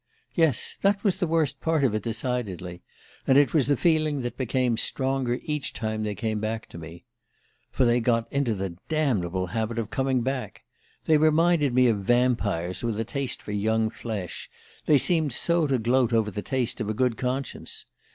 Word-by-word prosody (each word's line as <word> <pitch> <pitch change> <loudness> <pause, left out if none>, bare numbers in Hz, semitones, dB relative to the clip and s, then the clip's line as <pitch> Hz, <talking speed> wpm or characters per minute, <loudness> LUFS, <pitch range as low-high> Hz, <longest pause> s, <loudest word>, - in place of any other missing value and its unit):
Yes, 160 - 0
that 200 0 +2
was 190 -3 +1
the 180 - +1
worst 155 -4 0
part 160 -3 +1
of 125 -6 +2
it, 110 - -1
decidedly; 110 -6 -4 0.5
and 135 - +5
it 145 -1 +4
was 145 -6 +3
the 145 -2 +2
feeling 155 -3 +2
that 120 0 -4
became 125 -1 0
stronger 130 +1 -1
each 150 -2 -3
time 110 -1 -3
they 105 -1 -2
came 110 +1 -2
back 110 +1 -3
to 85 - -9
me... 80 +1 -11 0.6
"For 130 - +1
they 120 0 +3
got 115 -1 +1
into 135 -5 +1
the 95 -3 -5
damnable 100 - 0
habit 110 +5 -3
of 110 -2 -3
coming 135 -2 0
back. 130 0 -4 0.4
They 155 - +5
reminded 155 -3 +3
me 130 0 +5
of 115 -4 +2
vampires 100 -6 0
with 115 -2 -1
a 115 - -1
taste 135 +1 -2
for - - -6
young 110 +2 +1
flesh, 105 -8 -6 0.4
they 150 - +6
seemed 160 -3 +2
so 170 +4 +2
to 135 -2 +1
gloat 120 +1 +2
over 110 -2 +2
the 105 - -4
taste 130 0 -1
of 110 - -2
a 110 - -2
good 125 0 +1
conscience. 130 +2 -4
125 Hz, 190 wpm, -26 LUFS, 110-140 Hz, 0.6 s, they